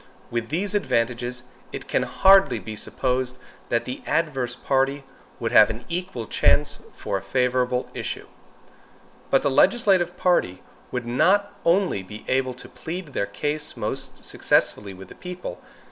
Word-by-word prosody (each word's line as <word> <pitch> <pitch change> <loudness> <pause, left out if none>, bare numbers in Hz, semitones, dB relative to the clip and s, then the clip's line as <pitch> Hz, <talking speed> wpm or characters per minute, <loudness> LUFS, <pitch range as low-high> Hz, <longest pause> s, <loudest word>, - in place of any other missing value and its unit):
With 115 -1 -2
these 190 +6 -1
advantages, 120 - 0 0.3
it - - -7
can - - +1
hardly 195 0 +5
be 110 0 -7
supposed 125 +3 -1 0.3
that 120 - +1
the 125 - -5
adverse 135 -7 0
party 135 +2 0 0.4
would - - -2
have - - +7
an 110 +2 -6
equal 175 -9 -3
chance 145 +6 +2 0.2
for - - -2
a - - -6
favorable 125 +3 0
issue. - - -4 1.0
But 135 - +3
the 140 - +2
legislative 190 - +3
party 95 - +1 0.3
would 125 -1 -3
not 190 +12 +3
only 175 - +2
be 105 +3 -10
able 130 -1 +1
to 125 - -11
plead 175 0 -6
their 100 -7 -2
cause 150 +8 -3
most - - -4
successfully 100 -2 +1
with 95 +1 -12
the - - -10
people. 180 - -7
130 Hz, 145 wpm, -24 LUFS, 120-175 Hz, 1.0 s, have